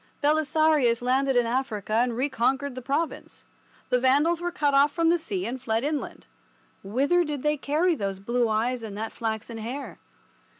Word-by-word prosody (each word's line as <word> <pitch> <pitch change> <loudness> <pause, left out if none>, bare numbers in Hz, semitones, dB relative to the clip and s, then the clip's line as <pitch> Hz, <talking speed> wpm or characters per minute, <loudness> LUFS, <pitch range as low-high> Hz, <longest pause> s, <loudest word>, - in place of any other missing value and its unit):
Belisarius 300 -5 +2
landed 265 +2 +2
in 245 -1 +3
Africa 230 -4 -2
and 235 +1 +1
reconquered 265 +1 0
the 255 - -7
province. 285 +6 -3 0.4
The 250 - +3
Vandals 290 +7 +3
were 350 - -1
cut 295 -5 0
off 280 +1 +5
from 330 +2 +1
the 345 +1 +3
sea 365 +3 -3
and 255 +1 -4
fled 225 -1 -1
inland. 295 0 -3 0.6
Whither 275 - +1
did 295 -4 -4
they 300 0 +2
carry 305 +5 +1
those 195 -9 -3
blue 235 +4 0
eyes 235 +3 0
and 210 -3 -7
that 220 +1 -4
flaxen 225 0 -4
hair? 250 +6 -6
265 Hz, 170 wpm, -26 LUFS, 235-300 Hz, 0.6 s, off